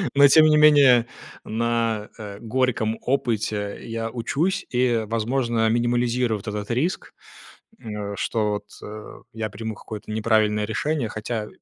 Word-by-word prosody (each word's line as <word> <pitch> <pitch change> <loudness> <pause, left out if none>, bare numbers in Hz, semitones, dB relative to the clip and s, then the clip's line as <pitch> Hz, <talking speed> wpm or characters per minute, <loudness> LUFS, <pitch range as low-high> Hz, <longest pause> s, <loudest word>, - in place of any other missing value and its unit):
Но, 140 0 +8
тем 155 +3 +7
не 155 0 +5
менее, 140 -6 +6 0.4
на, 115 -1 -1
э, 100 -3 -8
горьком 115 -2 0
опыте 110 -5 -1
я 115 0 -4
учусь 155 - -1
и, 120 -2 +1
возможно, 115 0 0
минимализирую 120 -1 +1
вот 100 - -14
этот 105 +1 -4
риск, 150 +10 -2 0.7
м, 105 -2 -5
э, - - -5
что 110 0 -1
вот - - -37 0.7
я 110 -1 -4
приму 110 +2 -5
какое-то 105 0 -8
неправильное 110 -1 +2
решение, 135 +4 -1
хотя 110 0 -4
115 Hz, 135 wpm, -23 LUFS, 110-125 Hz, 0.7 s, Но